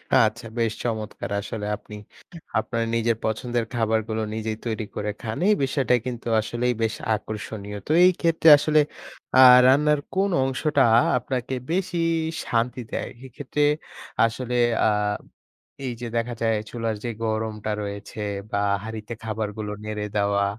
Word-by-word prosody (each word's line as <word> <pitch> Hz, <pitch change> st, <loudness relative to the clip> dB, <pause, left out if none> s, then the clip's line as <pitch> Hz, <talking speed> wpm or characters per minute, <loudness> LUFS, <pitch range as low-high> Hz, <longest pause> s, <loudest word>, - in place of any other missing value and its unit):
আচ্ছা, 115 Hz, +1 st, +3 dB
বেশ 115 Hz, -2 st, +1 dB
চমৎকার! 110 Hz, -4 st, -3 dB
আসলে 105 Hz, 0 st, -5 dB
আপনি 105 Hz, 0 st, -12 dB, 0.6 s
আপনার 115 Hz, +1 st, -2 dB
নিজের 115 Hz, -1 st, +1 dB
পছন্দের 115 Hz, +1 st, -1 dB
খাবারগুলো 110 Hz, -1 st, 0 dB
নিজেই 110 Hz, 0 st, -3 dB
তৈরি 110 Hz, -1 st, -2 dB
করে 105 Hz, 0 st, -2 dB
খান। 110 Hz, +1 st, -4 dB
এই 210 Hz, -, +5 dB
বিষয়টা 130 Hz, -2 st, +2 dB
কিন্তু 120 Hz, -2 st, -5 dB
আসলেই 120 Hz, +2 st, -1 dB
বেশ 110 Hz, -, 0 dB, 0.2 s
আকর্ষণীয়। 105 Hz, -1 st, -6 dB
তো -, -, -1 dB
এই 185 Hz, -, +7 dB
ক্ষেত্রে 165 Hz, -1 st, +4 dB
আসলে 155 Hz, +1 st, +3 dB, 0.6 s
আ -, -, +10 dB, 0.3 s
রান্নার 150 Hz, +2 st, +4 dB, 0.2 s
কোন 195 Hz, +1 st, +2 dB
অংশটা 135 Hz, +2 st, +1 dB, 0.3 s
আপনাকে 125 Hz, +1 st, -3 dB, 0.2 s
বেশি 180 Hz, -1 st, -1 dB, 0.5 s
শান্তি 120 Hz, +2 st, 0 dB
দেয়? -, -, -3 dB, 0.2 s
এক্ষেত্রে 145 Hz, +3 st, -2 dB, 0.6 s
আসলে 125 Hz, +2 st, -3 dB, 0.3 s
আ -, -, +4 dB, 1.0 s
এই 125 Hz, -, -2 dB
যে, 120 Hz, -, -3 dB
দেখা 120 Hz, +1 st, -1 dB
যায় 115 Hz, -1 st, +2 dB
চুলার 115 Hz, -2 st, -2 dB
যে 120 Hz, -, -2 dB
গরমটা 110 Hz, -1 st, -2 dB
রয়েছে 100 Hz, +1 st, -7 dB, 0.3 s
বা 100 Hz, -, 0 dB, 0.3 s
হাড়িতে 110 Hz, 0 st, -6 dB
খাবারগুলো 105 Hz, -1 st, -4 dB
নেড়ে 105 Hz, -1 st, -3 dB
দেওয়া 100 Hz, 0 st, +2 dB
115 Hz, 135 wpm, -24 LUFS, 110-125 Hz, 1.0 s, আ